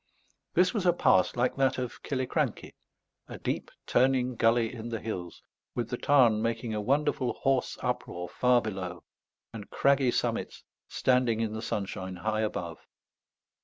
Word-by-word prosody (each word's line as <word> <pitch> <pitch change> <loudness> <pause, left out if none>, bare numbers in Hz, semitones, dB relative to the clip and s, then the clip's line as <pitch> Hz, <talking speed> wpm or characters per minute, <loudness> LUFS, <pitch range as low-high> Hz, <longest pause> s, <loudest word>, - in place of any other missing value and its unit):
This 180 +4 +4
was 200 -6 0
a 175 - +6
pass 95 - +3
like 125 +2 0
that 135 -1 +2
of 125 -2 -5
Killiecrankie; 130 -2 -2 0.5
a - - -8
deep - - -3 0.2
turning 130 0 +2
gully 115 0 +2
in 115 -1 -6
the 115 -1 -3
hills, 90 -6 -6 0.3
with 120 - -3
the 125 - -1
Tarn 120 -7 +4
making 115 0 -2
a 105 - -1
wonderful 130 +1 +1
hoarse 135 -1 0
uproar 125 -8 -3
far 125 +3 +2
below, 95 -4 -5 0.5
and 105 -3 -8
craggy 140 -2 +3
summits - - -2 0.2
standing 125 -3 +2
in 110 -1 -1
the 110 - -4
sunshine 95 -4 -4
high 110 +4 -1
above. 85 -6 -3
120 Hz, 150 wpm, -29 LUFS, 110-130 Hz, 0.5 s, a